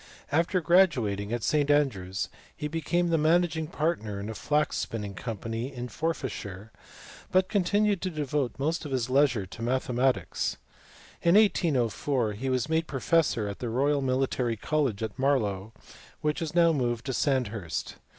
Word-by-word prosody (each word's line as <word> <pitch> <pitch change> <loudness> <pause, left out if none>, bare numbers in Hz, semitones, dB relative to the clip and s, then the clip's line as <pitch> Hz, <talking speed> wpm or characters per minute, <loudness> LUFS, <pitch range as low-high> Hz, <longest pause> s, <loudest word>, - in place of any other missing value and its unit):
After 170 +5 +2
graduating 130 - +3
at 120 -2 -2
St 145 +2 +2
Andrews 100 -11 +1 0.3
he 150 - -3
became 165 +3 0
the 165 -1 +2
managing 160 0 +2
partner 150 - -2
in 100 +2 -5
a - - -4
flax 150 +6 0
spinning 105 -3 -4
company 115 +4 -4
in 125 -2 -6
Forfarshire, 110 - -4 0.6
but 185 0 +3
continued 205 0 +2
to 185 - -1
devote 150 -5 -2
most 155 +5 -1
of 150 - -6
his 130 -1 -1
leisure 130 -7 +3
to 95 - -11
mathematics. 125 -3 0 0.6
In 170 +2 +4
1804 140 - +2
he 130 +6 -3
was 130 +2 0
made 160 +1 0
professor 135 -5 +1
at 100 - -6
the 120 - -3
Royal 140 +4 +1
Military 130 -3 0
College 130 -5 0
at 110 +1 -5
Marlow, 110 -7 +1 0.5
which 150 +1 -1
is 165 0 -4
now 170 -1 +5
moved 120 -4 -1
to 135 - -2
Sandhurst. 115 - -1
135 Hz, 150 wpm, -28 LUFS, 115-160 Hz, 0.6 s, now